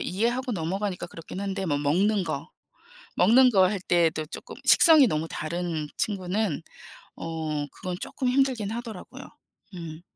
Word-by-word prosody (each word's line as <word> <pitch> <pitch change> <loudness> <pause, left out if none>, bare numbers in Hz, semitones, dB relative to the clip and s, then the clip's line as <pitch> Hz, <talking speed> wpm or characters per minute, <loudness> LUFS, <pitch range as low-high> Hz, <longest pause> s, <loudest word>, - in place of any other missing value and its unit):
이해하고 240 +6 -1
넘어가니까 185 +1 -3
그렇긴 170 +2 -9
한데 195 -1 -3
뭐 145 -5 0
먹는 190 +8 +1
것 - - -4 0.7
먹는 245 +8 +6
것 190 -5 +4
할 200 -2 -3
때에도 165 -4 +1
쪼끔 - - -9
식성이 315 -6 +8
너무 160 -4 -2
다른 160 -1 -3
친구는 195 -4 -1 0.6
어 155 -3 -4
그건 180 -1 -6
쪼끔 255 +5 -3
힘들긴 255 -5 +1
하더라고요. 225 -4 -7 0.5
음. 165 -2 -8
185 Hz, 300 characters per minute, -26 LUFS, 165-220 Hz, 0.7 s, 식성이